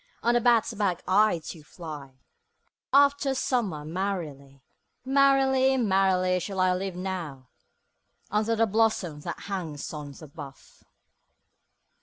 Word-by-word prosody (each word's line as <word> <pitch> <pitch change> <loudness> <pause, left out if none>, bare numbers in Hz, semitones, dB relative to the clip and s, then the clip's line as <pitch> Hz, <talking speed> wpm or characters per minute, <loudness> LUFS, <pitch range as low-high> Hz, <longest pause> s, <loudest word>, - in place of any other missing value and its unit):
On 235 - +3
the 240 - +3
bat's 235 -1 +3
back 200 -4 -1
I 190 -3 +3
do 165 - -8
fly 150 -4 -10 0.8
After 280 -1 +4
summer 210 - -1
merrily: 155 -7 -5 0.4
5 265 - -4
Merrily, 270 -1 +4
merrily, 190 -4 +2
shall 190 +2 -5
I 185 0 +3
live 185 0 -3
now, 170 -9 -5 0.8
Under 215 +2 +1
the 225 +1 +3
blossom 210 -7 0
that 170 +2 -6
hangs 170 -9 -5
on 145 -2 -7
the 155 +3 -12
bough. 145 -2 -10
190 Hz, 125 wpm, -27 LUFS, 155-225 Hz, 0.8 s, After